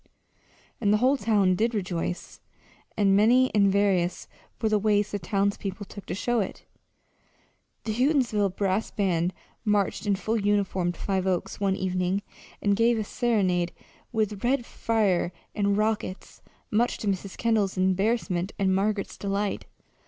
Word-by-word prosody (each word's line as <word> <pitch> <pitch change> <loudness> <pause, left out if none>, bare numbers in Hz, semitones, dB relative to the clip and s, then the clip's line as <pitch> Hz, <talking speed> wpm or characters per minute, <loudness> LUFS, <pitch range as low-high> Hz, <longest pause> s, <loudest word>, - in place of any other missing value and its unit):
And 205 -2 +3
the 210 - +5
whole 255 +5 +3
town 205 -8 +2
did 225 +5 0
rejoice 180 -3 -3 0.6
and 195 -2 +4
many 245 +5 +4
and 200 -2 +4
various 190 -3 +1 0.3
were 220 - +1
the 215 -1 +2
ways 205 0 +2
the 205 - -2
townspeople 200 +1 -2
took 200 0 -11
to - - -3
show 240 +4 0
it. 200 - -4 1.2
The 220 - -2
Houghtonsville 235 -7 +1
brass 200 +1 0
band 180 -3 0 0.3
marched 210 0 0
in 200 - +3
full 220 +3 -1
uniform 195 -3 +1
to - - -16
Five 190 -1 -1
Oaks 185 -2 -1
one 195 -1 +1
evening 185 +1 -1 0.4
and 205 -1 +3
gave 230 +2 +3
a 215 - -1
serenade 190 -7 0 0.4
with 215 -3 -1
red 245 0 +1
fire 205 -8 0 0.2
and 200 -1 +1
rockets, 215 -3 -2 0.3
much 235 +3 +1
to 215 - -5
Mrs. 195 0 -2
Kendall's 215 -5 +1
embarrassment 190 0 0
and 190 -1 +2
Margaret's 200 +1 -1
delight. 200 0 -2
200 Hz, 145 wpm, -26 LUFS, 190-220 Hz, 1.2 s, the